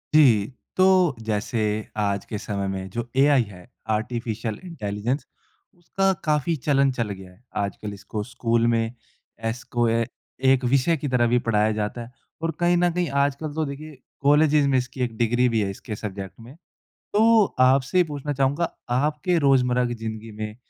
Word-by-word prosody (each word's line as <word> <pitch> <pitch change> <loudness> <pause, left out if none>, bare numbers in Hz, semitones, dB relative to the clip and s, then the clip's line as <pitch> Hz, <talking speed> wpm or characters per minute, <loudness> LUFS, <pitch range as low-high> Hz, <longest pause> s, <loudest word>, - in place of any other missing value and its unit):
जी, 115 -9 +6 0.3
तो 185 -5 +4
जैसे 110 +1 -2 0.4
आज 100 -1 0
के 105 - -5
समय 100 -1 -3
में 95 0 -4
जो 120 +4 -4
एआई 140 -1 +5
है, 100 -1 -13 0.2
आर्टिफ़िशियल 110 0 -2
इंटेलिजेंस 120 - -3 0.5
उसका 195 +3 0
काफ़ी 155 +2 +1
चलन 140 -2 +4
चल 120 -4 -2
गया। 95 -2 -9 0.3
आजकल 100 +1 -5
इसको 105 +1 -5
स्कूल 115 0 0
में 115 0 +1 0.5
एस 115 +2 -2
को 120 -1 0
ए, 115 0 +1 0.3
एक 130 0 +3
विषय 135 +6 +2
की 145 - -4
तरह 125 -3 +2
भी 120 +1 +3
पढ़ाया 105 0 +3
जाता 105 +2 -3
है 120 - -15 0.3
और 165 0 0
कहीं 175 0 +3
न 175 0 +3
कहीं 175 -2 0
आजकल 145 +2 -2
तो 160 +1 -1
देखिए 145 +1 -8 0.2
कॉलेजेज़ 145 0 +4
में 135 -1 +3
इसकी 125 +1 -3
एक 120 -2 -3
डिग्री 120 +2 +2
भी 115 -2 +1
है 100 - -1
इसके 105 +3 -7
सब्जेक्ट 100 -3 -7
में, 120 +4 -12 0.6
तो 220 0 +5 0.2
आपसे 135 +7 +3
पूछना 145 -2 -4
चाहूँगा 140 +5 0 0.2
आपके 150 +6 +1
रोज़मर्रा 125 -2 +3
की 120 - -3
ज़िंदगी 110 0 -6
में 105 0 -4
125 Hz, 170 wpm, -24 LUFS, 110-145 Hz, 0.6 s, जी